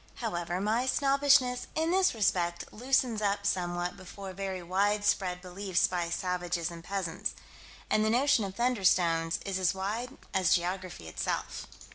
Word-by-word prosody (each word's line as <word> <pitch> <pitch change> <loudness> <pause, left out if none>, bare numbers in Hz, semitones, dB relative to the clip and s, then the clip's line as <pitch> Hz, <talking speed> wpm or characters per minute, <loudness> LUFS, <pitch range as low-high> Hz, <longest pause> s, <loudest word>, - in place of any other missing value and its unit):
However, 175 -6 -3
my 220 +6 +1
snobbishness, 275 -2 +3
in 320 +1 +1
this 375 -6 +3
respect, 175 -5 0
loosens 250 -1 +1
up 200 0 0
somewhat 175 -2 -1
before 190 0 -9
very 190 -1 -4
widespread 195 -1 +1
belief 185 0 0
by 175 -2 -1
savages 175 -1 -2
and 165 -1 -9
peasants. 180 -3 -3 0.5
And 215 - +2
the 215 - +2
notion 250 0 +3
of 195 -1 -5
"thunderstones" 180 -9 +2
is 195 -1 -2
as 185 0 +2
wide 225 +7 -4 0.2
as 190 -3 +4
geography 180 - -3
itself. 80 - -3
195 Hz, 140 wpm, -30 LUFS, 175-225 Hz, 0.5 s, as